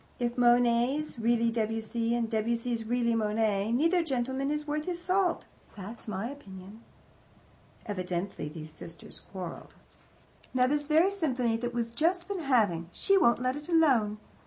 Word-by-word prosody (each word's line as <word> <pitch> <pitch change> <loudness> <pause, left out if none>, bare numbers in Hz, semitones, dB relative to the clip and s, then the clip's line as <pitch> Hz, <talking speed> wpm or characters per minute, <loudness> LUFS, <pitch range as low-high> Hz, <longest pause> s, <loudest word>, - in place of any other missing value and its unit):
If 240 -1 -1
Monet's 245 +3 +3
really 235 0 +2
Debussy, 225 +1 -1
and 235 -1 0
Debussy's 230 +1 -1
really 235 0 +1
Monet, 215 -1 +1
neither 330 +8 +3
gentleman 265 -1 -1
is 300 0 -2
worth 300 0 -2
his 355 -1 -3
salt 365 0 +1 0.3
that's 215 +5 -8
my 210 +1 -3
opinion. 205 -6 -10 1.0
Evidently 185 -5 -3
these 155 0 -9
sisters 165 +1 -10
quarrelled. 180 -4 -7 0.8
"Now, 250 0 +4
this 290 +2 0
very 325 +5 +4
symphony 255 -11 0
that 240 +1 -4
we've 235 -1 -2
just 345 +7 +1
been 400 -2 -3
having 210 - +1
she 395 - +2
won't 245 -9 +4
let 255 +1 +1
it 295 +3 -8
alone. 260 -11 +3
235 Hz, 145 wpm, -29 LUFS, 220-295 Hz, 1.0 s, Now